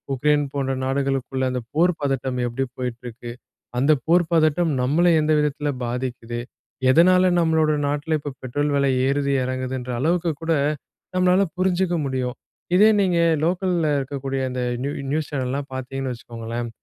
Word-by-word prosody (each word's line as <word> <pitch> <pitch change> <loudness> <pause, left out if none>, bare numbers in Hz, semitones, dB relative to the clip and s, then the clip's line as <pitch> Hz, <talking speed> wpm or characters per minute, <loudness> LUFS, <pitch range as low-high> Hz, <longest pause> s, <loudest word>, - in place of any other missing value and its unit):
Ukraine 145 +2 +2
போன்ற 135 -1 -1
நாடுகளுக்குள்ளே 135 -1 -1
அந்த 125 - -2
போர் 175 +4 +4
பதட்டம் 130 -2 -1
எப்படி 120 +3 -2
போயிட்டிருக்கு. 120 -1 -6 0.5
அந்த 140 +4 +4
போர் 175 +2 +4
பதட்டம் 160 0 +3
நம்மள 150 +8 +2
எந்த 155 +1 +1
விதத்தில 150 0 -1 0.2
பாதிக்குது. 120 -1 -4 0.5
எதனால 180 +6 +5
நம்மளோட 160 -2 +3 0.2
நாட்டில 150 +2 0
இப்போ 145 -1 -6
பெட்ரோல் 145 +4 -1
விலை 140 -1 +2 0.2
ஏறுது? 140 0 +1
இறங்குதுன்ற 130 0 -3
அளவுக்கு 170 +2 +1
கூட 165 - -1 0.6
நம்மளால 185 +1 +4 0.2
புரிஞ்சுக்க 185 -1 +1
முடியும். 130 -2 -2 0.4
இதே 210 +4 +7
நீங்க 180 -3 +2 0.3
லோக்கல்ல 175 -2 +1
இருக்கக்கூடிய 135 0 -3
அந்த 125 0 -3 0.2
நியூ 140 - -1 0.2
நியூஸ் 155 0 -1
சேனல்லலாம் 135 +1 -3
பார்த்தீங்கன்னு 130 0 -4
வச்சுக்கோங்களேன். 115 0 -6
140 Hz, 135 wpm, -23 LUFS, 130-160 Hz, 0.6 s, இதே